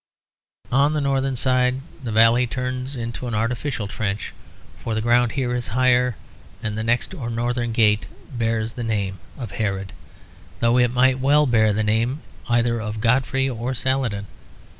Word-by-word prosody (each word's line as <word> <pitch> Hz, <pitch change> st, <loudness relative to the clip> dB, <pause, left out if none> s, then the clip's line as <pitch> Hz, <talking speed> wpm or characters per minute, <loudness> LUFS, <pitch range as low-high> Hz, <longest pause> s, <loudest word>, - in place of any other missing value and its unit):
On 140 Hz, +4 st, +3 dB
the 155 Hz, -, 0 dB
northern 135 Hz, -1 st, 0 dB
side 130 Hz, +1 st, +2 dB, 0.2 s
the 120 Hz, -, -3 dB
valley 115 Hz, +3 st, +5 dB
turns 125 Hz, +2 st, -3 dB
to 120 Hz, +1 st, -5 dB
an 120 Hz, -, -2 dB
artificial 115 Hz, +1 st, -2 dB
trench, 105 Hz, 0 st, -3 dB, 0.5 s
for 115 Hz, +1 st, -3 dB
the -, -, 0 dB
ground 120 Hz, 0 st, +3 dB
here 125 Hz, -3 st, -1 dB
is 120 Hz, -1 st, -2 dB
higher; 125 Hz, -1 st, +3 dB, 0.5 s
and 105 Hz, -2 st, -2 dB
the 110 Hz, -, -2 dB
next 120 Hz, +9 st, 0 dB
or 130 Hz, -10 st, -5 dB
northern 120 Hz, +1 st, -1 dB
gate 110 Hz, -2 st, +3 dB, 0.2 s
bears 115 Hz, -2 st, -1 dB
the 120 Hz, -, -5 dB
name 100 Hz, -4 st, -2 dB, 0.2 s
of 120 Hz, -7 st, -6 dB
Herod; 100 Hz, -2 st, -3 dB, 0.7 s
though 115 Hz, +1 st, +3 dB
it 120 Hz, -1 st, +4 dB
might 130 Hz, +1 st, +3 dB
well 145 Hz, +3 st, +4 dB
bear 110 Hz, -4 st, +3 dB
the 110 Hz, +1 st, 0 dB
name 115 Hz, +7 st, 0 dB, 0.3 s
either 120 Hz, -1 st, +2 dB
of 105 Hz, 0 st, -4 dB
Godfrey 130 Hz, +3 st, +2 dB
or 125 Hz, +1 st, -3 dB
Saladin. 125 Hz, -6 st, -1 dB
120 Hz, 160 wpm, -22 LUFS, 110-130 Hz, 0.7 s, valley